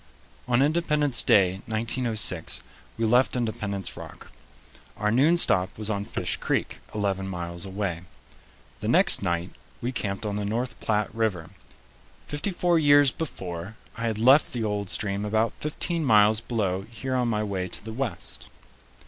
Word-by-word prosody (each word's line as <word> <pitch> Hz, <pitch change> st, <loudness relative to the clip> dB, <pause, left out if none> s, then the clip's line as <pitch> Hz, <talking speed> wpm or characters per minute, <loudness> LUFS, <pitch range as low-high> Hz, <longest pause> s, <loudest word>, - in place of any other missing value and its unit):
On 125 Hz, +2 st, +3 dB
Independence 150 Hz, -3 st, +2 dB
Day, 95 Hz, -1 st, +3 dB
1906, 110 Hz, -5 st, +1 dB, 0.4 s
we 115 Hz, -, 0 dB
left 125 Hz, +4 st, +3 dB
Independence 105 Hz, -5 st, -3 dB
Rock. -, -, -11 dB, 0.7 s
Our 105 Hz, 0 st, 0 dB
noon 145 Hz, +9 st, +4 dB
stop 95 Hz, -, +3 dB
was 110 Hz, 0 st, -2 dB
on 100 Hz, -1 st, -2 dB
Fish -, -, -3 dB
Creek, -, -, -2 dB, 0.2 s
eleven 100 Hz, -2 st, -1 dB
miles 85 Hz, 0 st, -5 dB
away. 95 Hz, -3 st, -3 dB, 0.8 s
The -, -, -5 dB
next -, -, +6 dB
night 85 Hz, -1 st, -2 dB, 0.3 s
we 120 Hz, -, -3 dB
camped 100 Hz, -4 st, -4 dB
on 105 Hz, -1 st, -2 dB
the 105 Hz, -, -2 dB
North 115 Hz, +3 st, -3 dB
Platte 105 Hz, -1 st, -1 dB
River. 105 Hz, -8 st, -2 dB, 0.7 s
Fifty 145 Hz, +7 st, -3 dB
four 175 Hz, -2 st, +1 dB
years 145 Hz, -2 st, +5 dB
before, 95 Hz, -, -6 dB, 0.2 s
I 115 Hz, 0 st, -3 dB
had 110 Hz, -2 st, -2 dB
left 130 Hz, +7 st, +5 dB
the 120 Hz, -2 st, -2 dB
old 105 Hz, -2 st, -2 dB
stream 100 Hz, -1 st, -1 dB
about 110 Hz, +2 st, 0 dB
fifteen 165 Hz, +2 st, -2 dB
miles 110 Hz, -4 st, +5 dB
below 105 Hz, -5 st, -2 dB
here 120 Hz, +3 st, -5 dB
on 125 Hz, -1 st, +1 dB
my 105 Hz, -2 st, 0 dB
way 95 Hz, -3 st, -3 dB
to 90 Hz, -, -6 dB
the 110 Hz, -, -6 dB
West. 120 Hz, -7 st, -4 dB
110 Hz, 155 wpm, -26 LUFS, 100-125 Hz, 0.8 s, next